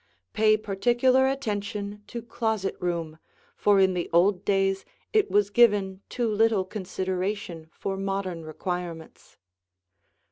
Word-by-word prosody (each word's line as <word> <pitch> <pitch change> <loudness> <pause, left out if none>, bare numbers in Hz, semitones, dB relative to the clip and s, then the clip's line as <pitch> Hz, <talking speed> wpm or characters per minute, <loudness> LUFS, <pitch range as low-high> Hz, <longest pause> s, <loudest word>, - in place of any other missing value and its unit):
Pay 215 0 +4
particular 240 +6 +2
attention 210 -5 -3
to 235 -1 -6
closet 220 -4 -2
room, 170 -3 -3 0.4
for 205 -1 +3
in 190 -1 +4
the 175 -1 -3
old 180 +3 +3
days 195 -1 +1 0.3
it 430 -2 +3
was 205 0 +2
given 205 -4 +3
too 240 -2 -1
little 215 -2 +2
consideration 185 -3 -4
for 195 - -4
modern 195 -3 -3
requirements. 170 0 -6
195 Hz, 115 wpm, -26 LUFS, 185-215 Hz, 0.4 s, Pay